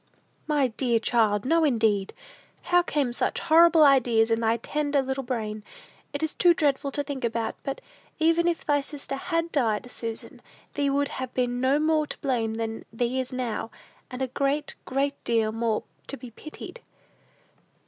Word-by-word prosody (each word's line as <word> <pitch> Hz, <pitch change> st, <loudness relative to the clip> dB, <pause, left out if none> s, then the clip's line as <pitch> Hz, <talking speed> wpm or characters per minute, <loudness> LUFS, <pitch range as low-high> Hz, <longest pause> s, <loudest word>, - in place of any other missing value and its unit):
"My 290 Hz, -4 st, +2 dB
dear 235 Hz, 0 st, +1 dB
child, 220 Hz, -2 st, +2 dB
no, 330 Hz, +4 st, +3 dB
indeed! 220 Hz, -8 st, +2 dB, 0.5 s
How 355 Hz, 0 st, +4 dB
came 285 Hz, -7 st, -1 dB
such -, -, -1 dB
horrible 330 Hz, 0 st, +6 dB
ideas 240 Hz, -5 st, +4 dB
in 225 Hz, -, +2 dB
thy 225 Hz, 0 st, +2 dB
tender 290 Hz, +4 st, -1 dB
little 265 Hz, 0 st, -1 dB
brain? 220 Hz, -4 st, -4 dB, 0.5 s
It 285 Hz, +2 st, -4 dB
is 315 Hz, -, -1 dB
too 350 Hz, -1 st, +4 dB
dreadful 285 Hz, -2 st, +1 dB
to 290 Hz, -, 0 dB
think 280 Hz, -2 st, -5 dB
about; 230 Hz, -1 st, -1 dB
but, 275 Hz, -, -5 dB, 0.4 s
even 330 Hz, +2 st, +3 dB
if 340 Hz, -1 st, -1 dB
thy 290 Hz, -1 st, +3 dB
little 280 Hz, -, -4 dB
sister 285 Hz, -2 st, -5 dB
had 330 Hz, +4 st, -2 dB
died, 245 Hz, -3 st, 0 dB
Susan, 225 Hz, -1 st, -6 dB, 0.3 s
thee 285 Hz, -1 st, 0 dB
would 280 Hz, +1 st, +1 dB
have 260 Hz, -2 st, -5 dB
been 245 Hz, -1 st, 0 dB
no 265 Hz, +2 st, +3 dB
more 310 Hz, 0 st, +2 dB
to -, -, -6 dB
blame 230 Hz, -5 st, -1 dB
than 225 Hz, 0 st, -4 dB
thee 240 Hz, +3 st, -1 dB
is 255 Hz, -1 st, -2 dB
now, 240 Hz, -3 st, -3 dB, 0.4 s
and 255 Hz, +1 st, -4 dB
a -, -, 0 dB
great, 280 Hz, +3 st, -1 dB
great 280 Hz, +2 st, -1 dB
deal 225 Hz, -2 st, +1 dB
more 225 Hz, -1 st, -1 dB, 0.2 s
to 275 Hz, -, -4 dB
be 250 Hz, -3 st, -10 dB
pitied." 310 Hz, -, -10 dB
265 Hz, 175 wpm, -26 LUFS, 230-290 Hz, 0.5 s, horrible